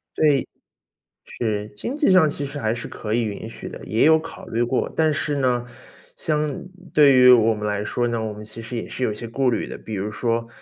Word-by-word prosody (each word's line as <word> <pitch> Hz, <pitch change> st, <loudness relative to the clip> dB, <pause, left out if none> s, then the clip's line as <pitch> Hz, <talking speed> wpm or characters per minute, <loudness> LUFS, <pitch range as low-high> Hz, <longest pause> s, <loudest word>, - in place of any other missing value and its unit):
对。 145 Hz, -4 st, +3 dB, 0.9 s
是， 105 Hz, -3 st, -2 dB
经 245 Hz, -, -4 dB
济 295 Hz, -8 st, +2 dB
上 180 Hz, -5 st, +6 dB
其 145 Hz, -, -4 dB
实 140 Hz, +1 st, -6 dB
还 110 Hz, -4 st, 0 dB
是 120 Hz, -, -6 dB
可 110 Hz, 0 st, -4 dB
以 120 Hz, -, +2 dB
允 110 Hz, 0 st, -4 dB
许 115 Hz, -, -8 dB
的， -, -, -9 dB
也 110 Hz, -, +1 dB
有 160 Hz, +1 st, +6 dB
考 165 Hz, +1 st, -9 dB
虑 115 Hz, +2 st, 0 dB
过。 125 Hz, +2 st, -1 dB
但 155 Hz, -2 st, +3 dB
是 145 Hz, 0 st, -1 dB
呢， 125 Hz, -3 st, +1 dB, 0.5 s
相 150 Hz, -2 st, -2 dB, 0.3 s
对 145 Hz, -3 st, +6 dB
于 125 Hz, 0 st, +8 dB
我 115 Hz, -2 st, +6 dB
们 105 Hz, 0 st, -6 dB
来 105 Hz, 0 st, -1 dB
说 120 Hz, +2 st, -1 dB
呢， 115 Hz, -1 st, -1 dB
我 110 Hz, -1 st, -3 dB
们 105 Hz, +1 st, -9 dB
其 110 Hz, +2 st, -9 dB
实 120 Hz, +2 st, -8 dB
也 115 Hz, -, -4 dB
是 130 Hz, -, -3 dB
有 110 Hz, -, 0 dB
一 -, -, -6 dB
些 115 Hz, +2 st, -7 dB
顾 135 Hz, +2 st, 0 dB
虑 120 Hz, -, 0 dB
的。 -, -, -7 dB
比 110 Hz, -, -7 dB
如 100 Hz, +2 st, -3 dB
说， 115 Hz, +2 st, -1 dB
120 Hz, 255 characters per minute, -22 LUFS, 110-145 Hz, 0.9 s, 于